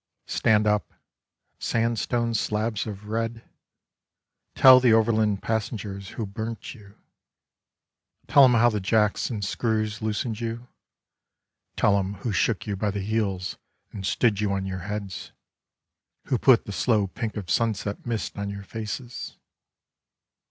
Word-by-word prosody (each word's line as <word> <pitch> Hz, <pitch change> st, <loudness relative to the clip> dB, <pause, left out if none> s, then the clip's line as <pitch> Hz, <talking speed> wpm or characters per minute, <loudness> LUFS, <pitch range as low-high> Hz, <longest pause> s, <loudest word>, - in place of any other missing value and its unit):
Stand 105 Hz, -1 st, +2 dB
up, 105 Hz, 0 st, 0 dB, 0.6 s
sandstone 115 Hz, +1 st, 0 dB
slabs 110 Hz, 0 st, -1 dB
of 105 Hz, -1 st, -7 dB
red. 115 Hz, +1 st, -2 dB, 1.1 s
Tell 130 Hz, -1 st, +9 dB
the 125 Hz, -3 st, +4 dB
overland 110 Hz, -2 st, +2 dB
passengers 105 Hz, -3 st, -3 dB
who 115 Hz, -, -2 dB
burnt 110 Hz, +3 st, -6 dB
you. 105 Hz, -4 st, -16 dB, 1.3 s
Tell 140 Hz, -1 st, +6 dB
'em 125 Hz, -, +4 dB
how 120 Hz, +1 st, +5 dB
the 105 Hz, -, -1 dB
jacks 105 Hz, +1 st, +1 dB
and 105 Hz, -5 st, -3 dB
screws 110 Hz, 0 st, -1 dB
loosened 110 Hz, +1 st, -2 dB
you. 115 Hz, +1 st, -5 dB, 1.1 s
Tell 100 Hz, -1 st, +3 dB
'em 100 Hz, +1 st, -3 dB
who 105 Hz, +4 st, -4 dB
shook 105 Hz, +2 st, 0 dB
you 105 Hz, -, -2 dB
by 105 Hz, +2 st, -1 dB
the 100 Hz, 0 st, -3 dB
heels 100 Hz, -3 st, -2 dB, 0.3 s
and 100 Hz, -, -7 dB
stood 100 Hz, +3 st, +1 dB
you 105 Hz, -2 st, 0 dB
on 95 Hz, -1 st, -2 dB
your 95 Hz, -1 st, -4 dB
heads. 100 Hz, -3 st, -5 dB, 0.9 s
Who 125 Hz, -, 0 dB
put 130 Hz, -4 st, +5 dB
the -, -, -6 dB
slow 105 Hz, 0 st, +2 dB
pink 110 Hz, +3 st, -5 dB
of 95 Hz, -4 st, -5 dB
sunset 110 Hz, -3 st, -1 dB
mist 115 Hz, -3 st, -3 dB
on 100 Hz, 0 st, -3 dB
your 100 Hz, 0 st, -6 dB
faces. 115 Hz, +4 st, -6 dB
110 Hz, 140 wpm, -25 LUFS, 100-115 Hz, 1.3 s, Tell